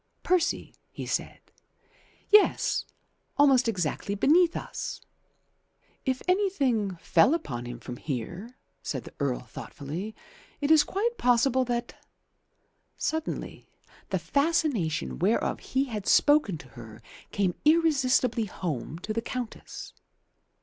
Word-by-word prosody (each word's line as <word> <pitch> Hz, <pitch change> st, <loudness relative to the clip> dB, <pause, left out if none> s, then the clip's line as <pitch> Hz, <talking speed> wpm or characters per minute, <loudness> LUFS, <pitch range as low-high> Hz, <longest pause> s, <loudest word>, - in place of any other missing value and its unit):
"Percy," 355 Hz, -2 st, +1 dB, 0.2 s
he -, -, -7 dB
said. -, -, -2 dB, 0.9 s
"Yes. 420 Hz, 0 st, +4 dB, 0.5 s
Almost 270 Hz, -4 st, +5 dB
exactly 195 Hz, -1 st, -1 dB
beneath 335 Hz, -, +4 dB
us." -, -, -5 dB, 1.1 s
"If 260 Hz, -2 st, -1 dB
anything 275 Hz, -, +1 dB
fell 170 Hz, -, +4 dB
upon 120 Hz, -, -5 dB
him 120 Hz, 0 st, -7 dB
from 125 Hz, +1 st, -7 dB
here," 175 Hz, -, -5 dB, 0.2 s
said -, -, -4 dB
the -, -, -12 dB
Earl 140 Hz, -4 st, 0 dB
thoughtfully, 150 Hz, -, -7 dB, 0.4 s
"it 290 Hz, +1 st, +1 dB
is 310 Hz, -2 st, +7 dB
quite 465 Hz, +5 st, -2 dB
possible 250 Hz, +1 st, +3 dB
that 240 Hz, 0 st, -4 dB, 0.5 s
" -, -, -45 dB
Suddenly 320 Hz, 0 st, -5 dB, 0.4 s
the -, -, +1 dB
fascination 280 Hz, -, 0 dB
whereof 200 Hz, +7 st, +1 dB
he 265 Hz, +1 st, 0 dB
had 215 Hz, -7 st, -5 dB
spoken 290 Hz, -, +4 dB
to 135 Hz, -, -14 dB
her 115 Hz, -2 st, -12 dB, 0.3 s
came 195 Hz, -3 st, +1 dB
irresistibly 270 Hz, -7 st, +3 dB
home 160 Hz, -, -4 dB
to 215 Hz, -, -2 dB
the 230 Hz, -, -1 dB
Countess. 245 Hz, 0 st, -6 dB
235 Hz, 115 wpm, -28 LUFS, -, 1.1 s, is